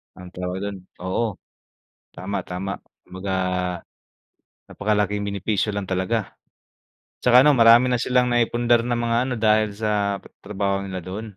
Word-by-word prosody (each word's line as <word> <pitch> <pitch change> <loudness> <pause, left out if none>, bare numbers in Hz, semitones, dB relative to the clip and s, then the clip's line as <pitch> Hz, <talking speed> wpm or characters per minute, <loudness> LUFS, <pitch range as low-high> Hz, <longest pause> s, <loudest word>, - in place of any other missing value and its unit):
anong 90 -1 -11
tawag 90 +1 -4
do'n 100 -2 -5 0.2
oo, 100 +2 -1 0.8
tama, 100 +2 -4
tama. 95 +2 -4 0.2
Kumbaga 95 +1 -6 1.4
napakalak 105 0 0
'yong 100 0 -2
benepisyo 100 +1 -1
lang 100 - -2
talaga. 95 +4 -2 0.9
'Tsaka, 125 +2 +6
ano, 150 - +6
marami 120 +1 +6
na 120 - +1
silang 125 -1 +2
naipundar 120 0 +2
na 120 0 -1
mga 115 0 0
ano, 125 - -1
dahil 110 -1 +3
sa 105 -2 0
pa - - -13
trabaho 100 -1 -2
nila 95 -3 -6
do'n. 100 +2 -7
105 Hz, 145 wpm, -23 LUFS, 95-115 Hz, 1.4 s, Tsaka